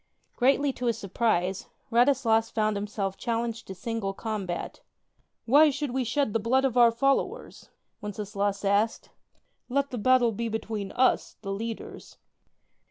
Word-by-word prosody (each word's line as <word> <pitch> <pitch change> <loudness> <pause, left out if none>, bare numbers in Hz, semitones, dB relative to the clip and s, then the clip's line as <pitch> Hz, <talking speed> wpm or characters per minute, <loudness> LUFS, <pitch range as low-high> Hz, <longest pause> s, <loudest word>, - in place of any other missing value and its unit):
Greatly 275 +2 +2
to 250 - -3
his 230 - +1
surprise, 195 -2 -1 0.2
Radislas 235 -2 +3
found 215 -1 0
himself 200 -1 -3
challenged 235 -1 -3
to 190 - -7
single 195 0 -3
combat. 200 -6 -4 0.6
"Why 295 +6 +6
should 290 -1 -3
we 260 +1 0
shed 245 -1 0
the 225 - +2
blood 255 +5 +2
of 255 -3 0
our 240 -1 +7
fol 275 +4 +3
lowers?" - - -7 0.3
Wenceslaus 205 -1 -3
asked: 205 +3 +1 0.6
"let 280 +2 0
the 245 - -4
battle 250 +1 +4
be 230 +2 -3
between 215 -2 -4
us, 255 +1 +2
the 195 - -4
leaders." 225 +3 -6
225 Hz, 145 wpm, -27 LUFS, 205-250 Hz, 0.6 s, our